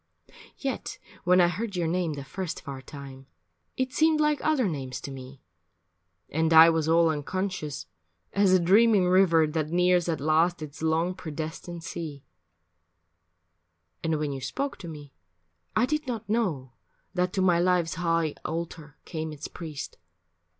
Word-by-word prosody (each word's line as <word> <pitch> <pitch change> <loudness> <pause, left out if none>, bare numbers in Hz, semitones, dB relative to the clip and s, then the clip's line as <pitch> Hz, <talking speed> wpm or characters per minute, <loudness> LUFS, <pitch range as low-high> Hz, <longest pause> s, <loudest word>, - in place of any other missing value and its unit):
Yet 270 -1 -4 0.3
when 180 +1 +5
I 175 - +6
heard 200 +4 -3
your 175 -2 0
name 170 -1 0
the 140 -1 -6
first 180 +4 -5
far 135 -1 -7
time 135 -1 -10 0.5
It 260 0 -1
seemed 315 +1 +3
like 300 -1 +2
other 295 -8 +2
names 130 -6 -4
to 140 - -6
me, 135 0 -10 0.8
and 160 +2 0
I 165 +1 +9
Was 160 -1 0
all 165 0 +5
unconscious, 155 - -3 0.5
as 200 -1 +4
a 185 - +6
dreaming 200 +2 +5
river 180 -3 +5
That 155 0 -2
nears 180 0 +3
at 160 -3 -1
last 160 +3 +2
its 150 0 -9
long 160 +3 +1
predestined 160 0 -6
sea; 155 -5 -6 1.8
And 160 -1 +1
when 150 -1 -2
you 135 - -6
spoke 275 - -3
to 175 - -8
me, 145 -3 -9 0.6
I 245 - +4
did 305 +2 -2
not 230 -3 -4
know 175 - -1 0.4
That 180 0 0
to 190 - 0
my 175 -2 +4
life's 175 -2 +2
high 165 -2 0
altar 160 -2 -5
came 160 -2 -4
its 150 -1 -7
priest. 155 -5 -7
165 Hz, 155 wpm, -27 LUFS, 155-185 Hz, 1.8 s, I